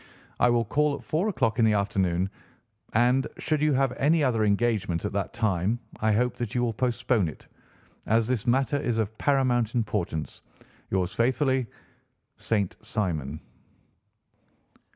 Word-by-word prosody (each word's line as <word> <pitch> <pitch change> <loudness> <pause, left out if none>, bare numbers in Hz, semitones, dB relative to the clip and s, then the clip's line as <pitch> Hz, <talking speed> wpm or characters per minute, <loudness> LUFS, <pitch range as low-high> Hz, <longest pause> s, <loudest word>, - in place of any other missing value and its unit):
I 125 - +5
will 120 -1 +2
call 145 +7 +1
at 140 - -10
four 175 +8 0
o'clock 115 - 0
in 115 - +5
the 110 - +4
afternoon, 95 -2 0 0.6
and, 125 +4 +3
should 155 -2 -1
you 155 0 +3
have 135 -1 +2
any 155 +3 +3
other 115 -5 +2
engagement 100 -5 0
at - - -3
that 100 -1 -2
time, 105 -1 0 0.2
I 110 0 +2
hope 125 +3 +1
that 120 -2 -4
you 125 - +1
will 115 -2 0
postpone 120 -4 +1
it, 75 - -9 0.6
as 115 +1 +3
this 125 -1 -2
matter 135 +3 +2
is 120 -5 -1
of 110 -1 -1
paramount 125 -4 +1
importance. 85 -9 -2 0.5
Yours 95 -1 -1
faithfully, 130 +3 +1
"'ROBERT - - -28 0.7
ST. 100 -5 0
SIMON. 80 -8 -3
115 Hz, 150 wpm, -26 LUFS, 100-130 Hz, 0.7 s, I